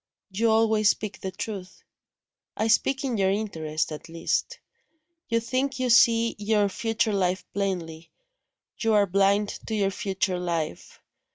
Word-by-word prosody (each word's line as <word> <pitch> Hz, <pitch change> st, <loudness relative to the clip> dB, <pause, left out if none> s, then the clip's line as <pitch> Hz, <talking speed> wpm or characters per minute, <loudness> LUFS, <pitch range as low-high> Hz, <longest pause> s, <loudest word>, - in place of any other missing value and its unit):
"You 225 Hz, +4 st, +1 dB
always 220 Hz, -1 st, +3 dB
speak 215 Hz, -2 st, -2 dB
the 190 Hz, -, -3 dB
truth." 190 Hz, -1 st, -7 dB, 0.7 s
"I 220 Hz, -, 0 dB
speak 270 Hz, +4 st, +2 dB
in 255 Hz, -4 st, -1 dB
your 190 Hz, -1 st, +2 dB
interest, 160 Hz, -7 st, -2 dB
at 155 Hz, +2 st, -8 dB
least. 165 Hz, 0 st, -2 dB, 0.7 s
You 230 Hz, 0 st, +2 dB
think 260 Hz, +3 st, -2 dB
you 255 Hz, -2 st, 0 dB
see 230 Hz, 0 st, +5 dB
your 210 Hz, -1 st, +2 dB
future 225 Hz, +2 st, -1 dB
life 185 Hz, -1 st, 0 dB
plainly 175 Hz, -5 st, -3 dB, 0.7 s
you 225 Hz, -2 st, +1 dB
are 205 Hz, -1 st, +5 dB
blind 200 Hz, +2 st, +2 dB, 0.2 s
to 220 Hz, -, -2 dB
your 200 Hz, -2 st, +1 dB
future 195 Hz, -3 st, -2 dB
life. 165 Hz, -, -4 dB
205 Hz, 145 wpm, -26 LUFS, 185-225 Hz, 0.7 s, see